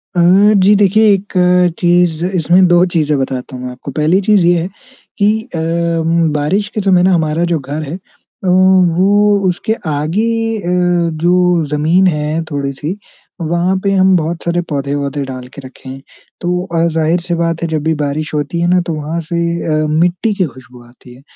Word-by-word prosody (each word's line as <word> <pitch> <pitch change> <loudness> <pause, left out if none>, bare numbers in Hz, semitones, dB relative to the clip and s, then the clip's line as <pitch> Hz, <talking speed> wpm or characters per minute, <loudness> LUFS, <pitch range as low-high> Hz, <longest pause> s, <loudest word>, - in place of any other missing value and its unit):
अ, - - +1 0.5
जी 205 +2 +5
देखिए, 210 +2 +4
एक 195 +1 -4 0.5
चीज़ 175 -2 +2
इसमें 180 0 +2
2 175 +1 +4
चीज़ें 150 -2 +1
बताता 130 0 -4
हूँ 125 - -8
मैं 125 - -5
आपको। 125 +3 -9
पहली 155 +6 +1
चीज़ 200 -3 +3
ये 175 -1 +3
है 175 - -3 0.5
कि 210 +2 +2
अ, 165 - -2 0.7
बारिश 180 +8 -1
के 215 - -1
समय 185 -2 +3
ना 185 - +3
हमारा 160 -1 0
जो 165 - +1
घर 145 +3 -5
है 150 +4 -6
अ, - - -9 0.5
वो 190 +2 +3
उसके 185 +4 -1 0.2
आगे 220 +10 -1
अ, 175 -2 0
जो 175 -1 +2
ज़मीन 165 +6 +2
है 155 -1 -1
थोड़ी-सी, 145 +5 -4 0.4
वहाँ 170 +3 0
पे 200 - +1
हम 190 -1 +3
बहुत 165 +1 -3
सारे 170 0 -1
पौधे, 140 -2 -3
वौधे 140 0 -3
डाल 130 -1 -8
के 140 - -10
रखे 130 0 -12
हैं। 135 +1 -9 0.4
तो 180 +1 -2
और 165 0 +2
ज़ाहिर-सी 165 +2 -1
बात 165 -1 -2
है, 170 - -1
जब 155 -2 -3
भी 160 +1 +1
बारिश 150 +1 -3
होती 150 +3 -2
है 170 - +1
ना, 180 +1 +3
तो 170 -1 -4
वहाँ 155 +2 -4
से 170 - -2 0.5
अ, - - -1
मिट्टी 175 +7 0
की 190 -3 0
खुशबू 125 -2 -13
आती 125 0 -17
है 130 - -17
170 Hz, 185 wpm, -14 LUFS, 150-185 Hz, 0.7 s, जी